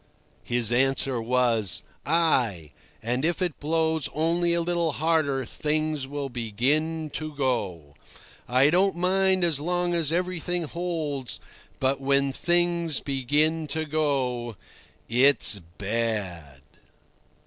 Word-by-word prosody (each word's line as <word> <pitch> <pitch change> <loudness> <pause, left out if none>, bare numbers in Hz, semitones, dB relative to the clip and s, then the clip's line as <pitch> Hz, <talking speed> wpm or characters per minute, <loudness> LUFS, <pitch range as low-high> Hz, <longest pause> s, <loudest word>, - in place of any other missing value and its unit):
His 120 -2 0
answer 135 0 +1
was: 115 -5 +1 0.2
"Ay, 125 - +1 0.3
and 125 +4 -1
if 170 +2 0
it 180 -5 -2
blows 160 0 0
only 170 +2 +1
a 170 - +1
little 170 -2 0
harder 150 -4 +1
things 155 +1 -1
will 140 0 -4
begin 140 +7 -1
to 155 0 -5
go. 100 - -2 0.5
I 130 +4 +4
don't 190 +2 +3
mind 185 +1 +2
as 165 -5 +2
long 175 +2 -1
as 165 -3 +1
everything 175 0 -1
holds, 155 -6 -3 0.4
but 135 +1 +1
when 140 0 +2
things 175 -1 +1
begin 150 +4 0
to 160 +2 -2
go 135 -6 -1 0.5
it's 125 -4 +3 0.2
bad." 95 - -3
145 Hz, 115 wpm, -26 LUFS, 125-165 Hz, 0.5 s, I